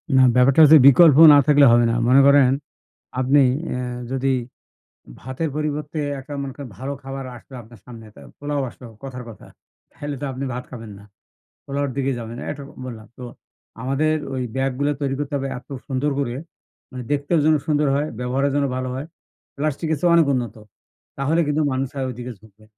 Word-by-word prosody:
না, 130 - +6
ব্যাপারটা 130 +3 +4
হচ্ছে 155 +1 +9
বিকল্প 145 +1 +7 0.2
না - - +7
থাকলে 145 -1 +6
হবে 120 0 +4
না। - - -1
মনে 130 +3 +6
করেন, 140 -2 +6 0.7
আপনি 130 +3 +3 0.4
এ - - -3 0.3
যদি 135 0 -1 0.9
ভাতের 130 +5 -4
পরিবর্তে 150 0 -3 0.2
একটা 135 +2 -10
মনে 135 -1 -6
করেন, 140 -3 -9
ভালো 135 +3 -5
খাবার 135 0 -6
আসলো 125 +3 -14
আপনার 115 0 -17
সামনে। 115 -3 -11
তা - - -14 0.2
পোলাও 145 0 -2
আসলো, 125 - -13 0.2
কথার 130 -2 -7
কথা। 110 - -13 0.5
তাহলে 145 -1 -6
তো - - -2
আপনি 130 +1 -6
ভাত 125 +1 -5
খাবেন 115 -4 -9
না। - - -15 0.6
পোলাওর 140 0 -2
দিকে 135 0 0
যাবেন, 115 0 -7
এইটুক 140 -1 -7 0.2
বললাম। 115 -3 -9
তো - - -12 0.6
আমাদের 140 +5 0 0.2
ওই 130 - -2
ব্যাগগুলো 135 +2 -1
তৈরি 135 -1 -1
করতে 145 -1 -4
হবে 135 0 -3
এত 125 - -14 0.2
সুন্দর 140 +2 -1
করে। 125 -4 -2 0.6
মানে 130 -1 -7
দেখতেও 145 +3 +1
যেন 155 0 +4
সুন্দর 150 -1 +1
হয়, 145 +2 -1
ব্যবহারে 130 +3 0
যেন 145 -1 +1
ভালো 130 0 -3
হয়, 135 +3 -5 0.5
প্লাস্টিকের 155 +2 -2
চেয়ে 175 - +3
অনেক 165 -2 +5
উন্নত। 120 -4 -3 0.6
তাহলে 145 +5 0
কিন্তু 150 +1 0
মানুষ 130 0 -2
আর 135 - -2
ওই - - -5
দিকে 125 +1 -6
ঝুকবে। 110 0 -21
135 Hz, 180 wpm, -21 LUFS, 125-145 Hz, 0.9 s, হচ্ছে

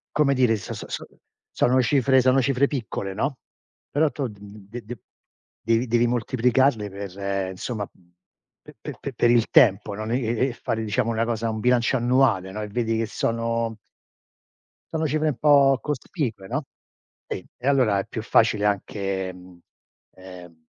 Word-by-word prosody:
Come 145 -2 +3
dire 125 -4 +3
so-so-so - - -6 0.5
sono 130 +1 +3
cifre 130 +1 +3
sono 130 +1 +4
cifre 135 +2 +2
piccole, 110 -8 -4
no, 130 +7 -2 0.5
però 150 +2 +2
tu 140 -3 -3
d-de-de 105 +2 -10 0.6
devi 115 +3 +1
devi 120 +1 +3
moltiplicarle 125 -1 +1
per 100 0 -4
insomma 100 +2 -4 0.7
pe-pe-pe - - -8
per 120 - +2
il 120 -1 +3
tempo, 100 -3 +4
no, 110 +2 -5
e-e-e 120 +1 0
fare 115 -1 -3
diciamo 115 +2 0
una 115 0 0
cosa 115 -1 -1
un 110 0 -3
bilancio 125 +2 +2
annuale, 120 -6 +2
no, 105 +2 -5
e 105 - -4
vedi 115 +1 -1
che 115 - 0
sono 115 0 -2 1.1
sono 160 0 -1
cifre 155 +1 0
un 145 -5 -1
po' 140 -2 +5
cospicue, 125 - -4
no. 145 +7 -2 0.6
Sì, 95 - -5
e 125 - -5
allora 125 -8 +3
è 95 - -4
più - - -5
facile 105 -1 +3
anche 100 -2 -1 0.8
ehm, 90 -3 -13
115 Hz, 140 wpm, -24 LUFS, 105-130 Hz, 1.1 s, po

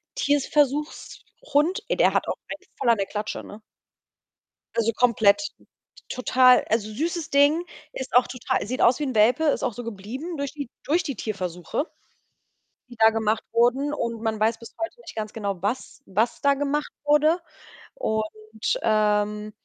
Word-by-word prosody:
Tierversuchs-Hund, 295 - 0
ey, - - 0
der - - +4
hat - - +1
auch - - -1
einen - - -8
voll 245 - +1
an 230 - +5
der 195 -1 -1
Klatsche, 210 0 -4
ne? 210 +2 -11 1.1
Also 230 0 +2
komplett, 230 -1 +4 0.7
total. 255 0 +5
Also, 215 -1 0
süßes 325 +6 -2
Ding, 290 +4 +4 0.3
ist 265 - -6
auch 250 - +6
total 250 -4 -2
sieht 255 +4 -3
aus 245 +4 +5
wie - - -1
'n 260 -5 -3
Welpe, 245 +9 +4
ist 295 - +1
auch 250 -4 0
so 245 - -7
geblieben 235 - -6
durch 280 0 -3
die 285 -5 -6
durch 335 +5 +1
die 275 -5 -4
Tierversuche 185 - -3 1.0
die 240 - -11
da 220 0 +7
gemacht 220 0 0
wurden, 250 +5 +2
und 230 -3 -3
man 220 -1 -1
weiß 225 +1 +2
bis 230 - -12
heute 410 +9 -5
nicht - - -11
ganz 215 -1 -4
genau, 200 -5 -3
was 235 +7 -3
was 220 +5 0
da 280 0 +4
gemacht 290 +2 -1
wurde. 300 +3 +4 0.6
Und, 220 - -1 0.6
ähm 210 -1 +1
245 Hz, 160 wpm, -25 LUFS, 215-290 Hz, 1.1 s, da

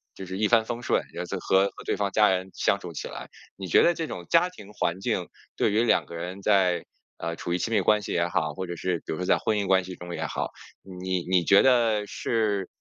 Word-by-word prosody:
就 95 - -8
是 95 +1 -5
一 105 0 +2
帆 115 0 +4
风 120 +1 -5
顺， - - +1
然 - - -4
后 - - -4
再 - - -4
和 95 +1 +3
和 - - -10
对 - - -1
方 100 -1 0
家 105 +1 +5
人 95 0 -1
相 100 +2 +1
处 90 -3 -8
起 - - -5
来。 - - -8 0.3
你 95 - -6
觉 85 - +5
得 175 - +4
这 165 -2 -4
种 90 - -7
家 170 +2 +5
庭 105 - -13
环 95 -3 -2
境， 95 -6 -1 0.3
对 - - +2
于 110 - +3
两 120 - +3
个 85 - -10
人 90 +3 -6
在 90 -3 +2 0.4
呃， 85 0 -2
处 85 - -4
于 90 - 0
亲 115 - -2
密 105 -3 +3
关 105 +2 +3
系 - - -6
也 85 0 +1
好， 80 -5 -1
或 95 - -4
者 85 -1 -5
是 90 +1 -1
比 - - -3
如 - - -4
说 90 - -3
在 - - +4
婚 110 - 0
姻 100 - -2
关 95 -1 +4
系 90 0 -7
中 90 0 -7
也 - - -3
好， - - -3 0.3
你 95 -1 -3
你 90 -2 +3
觉 100 +4 +6
得 115 -5 +3
是 105 -5 -1
95 Hz, 290 characters per minute, -26 LUFS, 90-105 Hz, 0.4 s, 觉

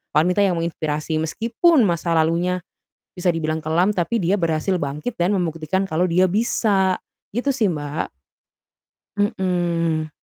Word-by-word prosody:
wanita 180 +6 +3
yang 195 -3 +3
menginspirasi, 155 -2 -2
meskipun 235 - +2
masa 170 -2 0
lalunya, 170 +3 +1 0.5
bisa 180 0 -4
dibilang 160 -2 0
kelam, 165 +5 +1
tapi 190 +2 -1
dia 190 +4 +2
berhasil 170 +2 0
bangkit 150 - -4
dan 185 +4 +2
membuktikan 170 +1 -1
kalau 180 -1 0
dia 180 +1 +3
bisa. 200 -3 +2 0.4
Gitu 275 +3 +1
sih, 230 -6 +1
Mbak. 150 -3 -3 1.1
Mhm. 175 -6 0
175 Hz, 130 wpm, -22 LUFS, 160-195 Hz, 1.1 s, wanita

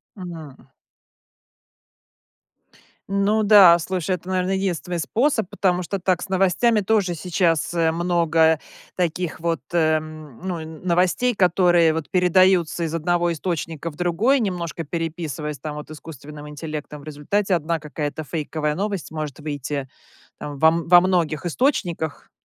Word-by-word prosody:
Мгм. 165 -8 -9 2.5
Ну 200 +2 +1
да, 200 -5 +8
слушай, 185 +1 -2
это, 180 0 -13
наверно, 185 0 0
единственный 180 -2 -2
способ. 225 - 0
Потому 180 -2 0
что 195 +3 -3
так 180 -1 0
с - - -8
новостями 195 +4 +2
тоже 200 -3 +1
сейчас, 170 -1 0
э, 165 -1 +2
много 165 -2 +2 0.4
таких 175 -1 -2
вот, 165 0 -1
э, 160 -2 +3
м, 155 -4 -9
ну, 175 -3 -2 0.2
новостей, 185 +8 +1
которые 175 -3 +4
вот 160 -2 -4
передаются 180 -2 +3
из 165 0 -2
одного 175 +1 +1
источника 165 -1 -4
в - - -17
другой, 180 - +2
немножко 175 -6 -3
переписываясь 160 -2 -4
там 150 -1 -6
вот 150 +1 -8
искусственным 150 -1 -10
интеллектом. 150 -1 -7
В - - -15
результате 155 +7 -1
1 165 -1 0
какая-то 150 0 -5
фейковая 150 +1 -3
новость 195 -2 -3
может 155 -3 -5
выйти 145 -2 -4 0.5
во 150 +2 +2
во 170 +1 +6
многих 175 -3 0
источниках, 175 - -1
170 Hz, 130 wpm, -22 LUFS, 155-185 Hz, 2.5 s, да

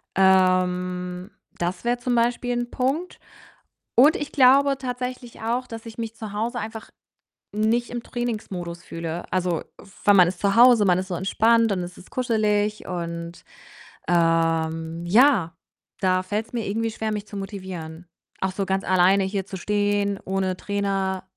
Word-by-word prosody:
Ähm, 180 0 +2 0.3
das 175 +1 -3
wäre 240 +1 +1
zum 245 +1 -2
Beispiel 240 +1 +1
'n 240 0 -3
Punkt 280 +8 -2 0.8
und 290 +7 +6
ich 295 - -5
glaube 275 +1 +5
tatsächlich 250 -1 -5
auch, 240 +3 -1
dass 225 -1 -8
ich 225 0 -10
mich 225 -1 -4
zu 220 -2 -8
Hause 230 +4 -2
einfach 220 0 -7 0.6
nicht 220 +3 +1
im 240 -1 -4
Trainingsmodus 195 -9 -5
fühle. 165 0 -5
Also, 180 -2 0 0.4
weil 205 - +6
man 180 -3 +6
ist 180 -1 -5
zu 200 +1 +1
Hause, 240 -3 +7
man 180 -1 +3
ist 190 - -4
so 185 - -3
entspannt 225 +5 +2
und 190 - -1
es 175 0 -7
ist - - -15
kuschelig 215 -4 0
und, 170 -1 -5 0.7
ähm, 165 -1 +1
ja, 205 - +4 0.4
da 185 -1 +2
fällt's 210 +4 -4
mir 230 -3 -2
irgendwie 225 +3 -1
schwer, 220 0 -3
mich 210 0 -4
zu 205 - -9
motivieren. 185 -4 -7 0.3
Auch 190 0 -1
so 195 +1 -2
ganz 190 0 0
alleine 190 +1 +4
hier 195 0 -2
zu 190 - -7
stehen, 205 0 0
ohne 190 -1 -1
Trainer, 195 -2 -2
200 Hz, 155 wpm, -24 LUFS, 180-230 Hz, 0.8 s, Hause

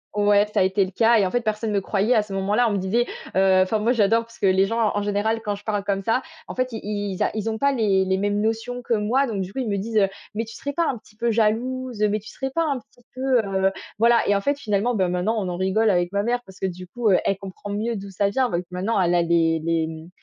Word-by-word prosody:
Ouais, 205 0 +4
ça - - +2
a - - +5
été 190 +1 +2
le 185 - -9
cas 230 +3 +4
et 200 - +3
en 185 - -2
fait, 245 - +1
personne 215 0 -2
me 200 -1 +1
croyait 205 +5 +1
à 220 - +4
ce 205 -2 -8
moment-là. 205 +5 +2
On - - -1
me - - 0
disait 210 +6 0 0.3
heu, 190 -1 +5
enfin, 215 +3 -1
moi 230 +4 +2
j'adore 225 0 +3
parce 230 0 -17
que - - -1
les 190 0 +4
gens, 230 -1 +1
en 205 - 0
général, 205 +2 0
quand 205 -1 -2
je 205 - -13
parle 205 -2 -1
comme 195 -1 -1
ça, 225 +5 +1 0.3
en - - -6
fait, 255 0 0
ils 205 -2 -3
ils - - 0
a - - 0
ils 220 +1 -2
ont 220 - -2
pas 280 +4 +2
les 200 -6 +2
les 190 0 +1
mêmes 205 +1 0
notions 225 +3 -2
que 235 - -1
moi. 230 +6 +2
Donc 210 -6 -3
du 185 +1 -5
coup, - - -12
ils 250 - -2
me 200 - 0
disent, 220 +2 -3
heu,: 195 - +5 0.3
«Mais 225 +1 -1
tu 225 - -11
serais 285 - -4
pas 335 +2 +1
un 245 - -2
petit 210 - -22
peu 235 +2 0
jalouse? 235 +2 0
Mais 215 - 0
tu 215 - -12
serais 265 -1 -5
pas 330 - 0
un 280 -4 0
petit 245 - -25
peu, 260 -1 +2
heu», 195 -1 +1 0.3
voilà. 235 +1 +5
Et 205 - +3
en 200 - 0
fait, 285 +5 0
finalement, 215 0 0
beh, 190 -3 +2
maintenant, 180 +6 0
on 185 -3 -2
en 175 - -4
rigole 190 +4 +2
avec 175 -1 +1
ma 200 - 0
mère 245 +1 0
parce 190 0 -15
que, 190 - 0
du 180 0 -7
coup, 225 +3 -1
elle 195 +1 +2
comprend 195 +1 -8
mieux 220 +3 -2
d'où 195 0 -7
ça 200 +1 +1
vient. 255 +4 +1
Donc 175 +1 -2
maintenant, 190 +3 0
elle 175 0 +2
a 175 - +3
des 165 -1 +2
des, 165 -1 0
mmh 160 +1 -9
210 Hz, 295 wpm, -23 LUFS, 190-230 Hz, 0.3 s, a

